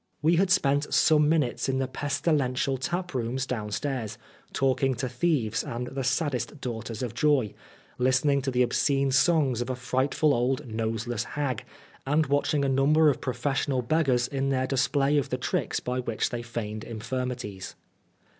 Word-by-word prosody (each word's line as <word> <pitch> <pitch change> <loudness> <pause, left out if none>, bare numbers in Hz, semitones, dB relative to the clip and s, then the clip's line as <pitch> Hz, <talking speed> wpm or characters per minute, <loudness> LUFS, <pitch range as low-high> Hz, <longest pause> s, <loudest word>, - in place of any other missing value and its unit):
We 165 +2 +4
had 190 +1 +3
spent 145 -6 +2
some 150 -2 +4
minutes 150 -6 +1
in 130 - +1
the 135 0 0
pestilential 135 -1 0
taprooms 135 -6 -2
downstairs, 115 0 -3 0.3
talking 135 0 +1
to 130 +3 -2
thieves 125 -4 0
and 120 +1 -4
the 135 +2 -4
saddest 135 +1 -1
daughters 115 -2 -5
of 120 -3 -4
joy, 130 -4 +2 0.5
listening 130 +3 +3
to 135 - -2
the 125 -1 +2
obscene 135 +2 +1
songs 140 -4 +3
of 120 - -3
a 130 - -1
frightful 130 +4 +1
old, 130 +4 0
noseless 115 0 -2
hag, 140 -5 -2 0.4
and 150 +3 +2
watching 145 0 +1
a - - +1
number 145 +3 +4
of - - -6
professional 130 +1 -1
beggars 130 -3 +2
in 135 0 -1
their 130 -1 +1
display 135 +2 +2
of 140 - -3
the 125 - -1
tricks 125 - -1
by 125 +1 -3
which 115 -3 -2
they 120 - -3
feigned 110 -2 -5
infirmities. 120 -3 -5
130 Hz, 155 wpm, -27 LUFS, 120-145 Hz, 0.5 s, We